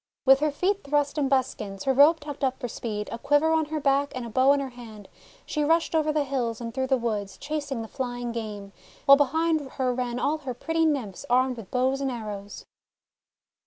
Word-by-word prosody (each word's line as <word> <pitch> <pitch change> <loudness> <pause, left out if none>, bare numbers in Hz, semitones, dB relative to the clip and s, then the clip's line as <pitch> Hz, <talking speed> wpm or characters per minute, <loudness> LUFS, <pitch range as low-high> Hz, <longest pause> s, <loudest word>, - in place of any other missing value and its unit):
With 270 0 +7
her 305 +1 +2
feet 385 +7 -1
thrust 290 +1 0
in 275 -2 +1
buskins, 245 -7 -1
her 270 - +2
robe 295 +5 +6
tucked 290 -2 -7
up 260 -1 0
for 250 - -3
speed, 210 -3 -4
a 230 - -5
quiver 290 +5 +3
on 320 -1 +2
her 305 +1 -3
back, 280 0 +1
and 255 -2 -4
a 230 - -8
bow 260 +5 +4
in 285 - +3
her 275 -1 -3
hand, 220 -5 -11 0.4
she 300 - -1
rushed 325 +3 +2
over 310 -1 +2
the 300 -1 +1
hills 250 -5 -2
and 230 -1 -6
through 260 0 -1
the 265 0 +3
woods, 210 -5 -3
chasing 285 -5 -4
the - - -8
flying 245 -1 -4
game; 210 -4 -6 0.3
while 275 - +9
behind 305 +1 +1
her 255 -1 0
ran 245 -1 -2
all 300 +4 0
her 260 -4 -5
pretty 325 +5 0
Nymphs 255 - -2
armed 255 +1 +3
with 225 -5 -10
bows 260 +2 0
and 270 - 0
arrows. 210 -4 -7
265 Hz, 215 wpm, -26 LUFS, 235-290 Hz, 0.4 s, while